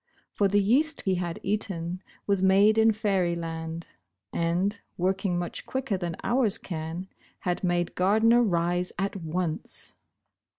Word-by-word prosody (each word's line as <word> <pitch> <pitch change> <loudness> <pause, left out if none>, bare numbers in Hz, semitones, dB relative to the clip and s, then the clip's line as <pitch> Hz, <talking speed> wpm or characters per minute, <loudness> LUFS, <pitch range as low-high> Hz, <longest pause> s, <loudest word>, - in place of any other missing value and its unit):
For 200 - +3
the 205 +1 +3
yeast 280 +10 +2
he 190 - +1
had 170 -1 -4
eaten 185 -4 -1 0.2
was 200 -2 +1
made 200 +3 +5
in 225 0 +6
fairyland, 170 -5 -1 0.5
and, 180 +5 0 0.2
working 190 0 0
much 175 0 -4
quicker 260 -5 -1
than 175 -3 -3
ours 235 -4 +2
can, 165 0 -5 0.3
had 180 0 -2
made 175 -1 0
Gardner 220 +6 +4
rise 175 -3 +1
at 195 +3 -1
once. 165 -1 -2
185 Hz, 130 wpm, -27 LUFS, 175-205 Hz, 0.5 s, in